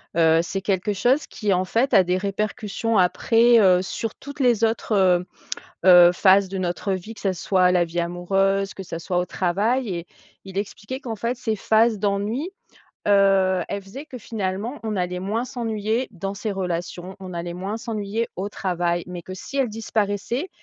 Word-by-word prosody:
Heu, 165 Hz, -1 st, +5 dB
c'est 190 Hz, +3 st, -4 dB
quelque 195 Hz, +1 st, 0 dB
chose 250 Hz, +9 st, +2 dB
qui 210 Hz, -2 st, -2 dB
en 185 Hz, 0 st, +2 dB
fait 235 Hz, +8 st, +1 dB
a 190 Hz, -, +7 dB
des 180 Hz, +1 st, 0 dB
répercussions 210 Hz, +2 st, -1 dB
après, 230 Hz, +6 st, +4 dB
heu, 185 Hz, -3 st, +5 dB
sur 220 Hz, +3 st, -4 dB
toutes 285 Hz, +1 st, -11 dB
les 240 Hz, -4 st, +3 dB
autres, 225 Hz, 0 st, 0 dB
heu 180 Hz, -2 st, +3 dB, 0.6 s
heu, 175 Hz, -1 st, +8 dB
phases 190 Hz, +1 st, +4 dB
de 195 Hz, -, -5 dB
notre 185 Hz, +2 st, -1 dB
vie, 190 Hz, +4 st, -6 dB
que -, -, -13 dB
ça 190 Hz, -2 st, 0 dB
soit 180 Hz, +1 st, +2 dB
la 180 Hz, -1 st, +3 dB
vie 170 Hz, +1 st, -3 dB
amoureuse, 195 Hz, +3 st, 0 dB
que 195 Hz, -, -8 dB
ça 165 Hz, -2 st, -6 dB
soit 180 Hz, +2 st, -2 dB
au 180 Hz, -, 0 dB
travail 205 Hz, +8 st, 0 dB
et 170 Hz, 0 st, -5 dB, 0.4 s
il 190 Hz, 0 st, -10 dB
expliquait 205 Hz, +5 st, -4 dB
qu'en 235 Hz, -5 st, -5 dB
fait 235 Hz, +4 st, -2 dB
ces 220 Hz, -3 st, -2 dB
phases 220 Hz, +1 st, +3 dB
d'ennui, 210 Hz, -, -1 dB, 0.6 s
heu, 195 Hz, -2 st, +4 dB
elles 200 Hz, 0 st, -4 dB
faisaient 265 Hz, +11 st, -9 dB
que 255 Hz, -, -9 dB
finalement 220 Hz, +3 st, -4 dB
on 215 Hz, -, -2 dB
allait 180 Hz, 0 st, -2 dB
moins 215 Hz, +5 st, -1 dB
s'ennuyer 225 Hz, -1 st, -2 dB
dans 195 Hz, +2 st, -4 dB
ses 210 Hz, +2 st, -4 dB
relations, 180 Hz, 0 st, -4 dB
on 185 Hz, -1 st, -8 dB
allait 170 Hz, 0 st, -4 dB
moins 195 Hz, +4 st, -4 dB
s'ennuyer 220 Hz, 0 st, -3 dB
au 195 Hz, +2 st, -3 dB
travail, 175 Hz, -3 st, -1 dB
mais 180 Hz, -1 st, -6 dB
que 185 Hz, +2 st, -8 dB
si 275 Hz, +8 st, -8 dB
elles 260 Hz, -3 st, +2 dB
disparaissaient, 220 Hz, -, -2 dB
195 Hz, 185 wpm, -23 LUFS, 180-225 Hz, 0.6 s, heu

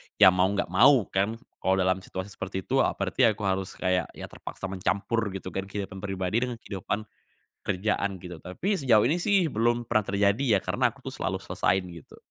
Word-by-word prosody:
ya 95 Hz, -3 st, +8 dB
mau 90 Hz, 0 st, +3 dB
nggak 100 Hz, -3 st, -2 dB
mau 125 Hz, +4 st, +6 dB
kan, 100 Hz, +4 st, +1 dB, 0.2 s
kalau 95 Hz, -, +2 dB
dalam 95 Hz, 0 st, +2 dB
situasi 95 Hz, +1 st, -7 dB
seperti 95 Hz, 0 st, -5 dB
itu, 135 Hz, +1 st, +1 dB
eee, -, -, +2 dB
berarti 100 Hz, +6 st, -1 dB
aku 105 Hz, -, -8 dB
harus 95 Hz, -1 st, -1 dB
kayak, 90 Hz, 0 st, 0 dB
ya -, -, -9 dB
terpaksa 95 Hz, 0 st, -7 dB
mencampur 100 Hz, +5 st, 0 dB, 0.2 s
gitu 95 Hz, -1 st, -6 dB
kan 95 Hz, 0 st, -4 dB
kehidupan 100 Hz, -1 st, -5 dB
pribadi 95 Hz, +2 st, -1 dB
dengan 125 Hz, -, -4 dB
kehidupan 105 Hz, -1 st, -4 dB, 0.6 s
kerjaan 100 Hz, 0 st, -1 dB
gitu. 90 Hz, -2 st, -8 dB
Tapi 90 Hz, -, -5 dB
sejauh 115 Hz, -6 st, +5 dB
ini 160 Hz, +8 st, +1 dB
sih 190 Hz, -6 st, +2 dB
belum 120 Hz, +2 st, +1 dB
pernah 110 Hz, -3 st, 0 dB
terjadi 100 Hz, +4 st, +3 dB
ya, -, -, +3 dB
karena -, -, +2 dB
aku -, -, -14 dB
tuh -, -, -5 dB
selalu -, -, -2 dB
selesaiin 95 Hz, 0 st, +1 dB
gitu. 85 Hz, -3 st, -13 dB
100 Hz, 195 wpm, -27 LUFS, 95-115 Hz, 0.6 s, ya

